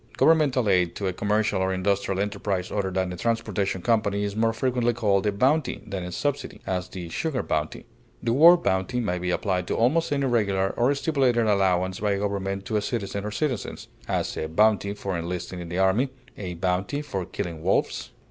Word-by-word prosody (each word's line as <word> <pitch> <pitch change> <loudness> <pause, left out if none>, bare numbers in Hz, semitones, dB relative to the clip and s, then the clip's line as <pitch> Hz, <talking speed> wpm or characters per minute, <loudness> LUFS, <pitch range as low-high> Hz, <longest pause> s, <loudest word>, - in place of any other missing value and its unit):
Governmental 145 -7 +4
aid 90 -3 +2
to 100 - -4
a 95 - 0
commercial 105 0 0
or 95 0 +1
industrial 100 0 0
enterprise 100 -2 -2
other 100 -2 -1
than 95 -1 -1
a - - -7
transportation 100 -3 -1
company 105 -3 +1
is 100 0 -3
more 115 +1 +2
frequently 120 0 0
called 105 -3 +1
a - - +3
bounty 135 +8 +1
than 95 -2 -4
a 90 - -5
subsidy; 145 +9 -3
as, 90 -1 -2
the 90 -3 -7
sugar 140 - -2
bounty. 80 0 -2 0.4
The 115 -1 +1
word 170 +6 +7
bounty 95 +6 0
may 90 -6 -1
be 90 0 -2
applied 90 -1 -1
to - - -1
almost 150 +9 +2
any 140 -1 +1
regular 100 -6 +1
or 130 +4 +2
stipulated 135 -6 +2
allowance 95 -3 +2
by 105 -1 +1
a - - 0
government 100 -1 -2
to 110 - 0
a - - +1
citizen 100 -2 -3
or - - -2
citizens; 130 0 -3 0.2
as, - - -1
a 80 - -2
bounty 100 +3 +2
for 100 -2 -3
enlisting 90 +1 -4
in 85 -1 -7
the 90 - -3
army; 95 +8 +3 0.3
a 90 -3 -5
bounty 95 - -1
for 100 -11 -3
killing 85 -2 -5
wolves. 95 +4 0
100 Hz, 195 wpm, -25 LUFS, 95-120 Hz, 0.4 s, word